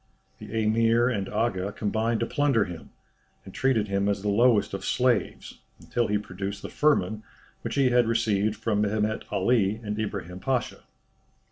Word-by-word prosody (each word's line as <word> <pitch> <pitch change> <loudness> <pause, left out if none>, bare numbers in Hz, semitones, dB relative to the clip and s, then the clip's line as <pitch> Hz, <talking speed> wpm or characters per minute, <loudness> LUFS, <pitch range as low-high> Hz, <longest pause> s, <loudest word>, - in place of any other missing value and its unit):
The - - -10
Emir 115 +2 +3
and 100 -6 -2
Aga 105 -3 -1
combined 110 +2 -1
to - - +2
plunder 140 -6 +1
him, 85 -2 -9 0.6
and 95 - -11
treated 125 -6 +1
him 100 0 0
as 100 -1 -1
the 105 - 0
lowest 115 0 +3
of 95 - -4
slaves, 125 -3 0 0.2
until 120 -1 -1
he 105 - +1
produced 100 0 -6
the - - -5
firman 110 -9 +1 0.4
which - - -4
he 135 -2 +3
had 120 -1 +4
received 110 -2 +1
from 105 -1 -1
Mehemet 105 +1 -1
Ali 100 0 +2
and 105 0 -4
Ibrahim 100 -4 -4
Pasha. 130 +1 -2
110 Hz, 160 wpm, -26 LUFS, 100-115 Hz, 0.6 s, had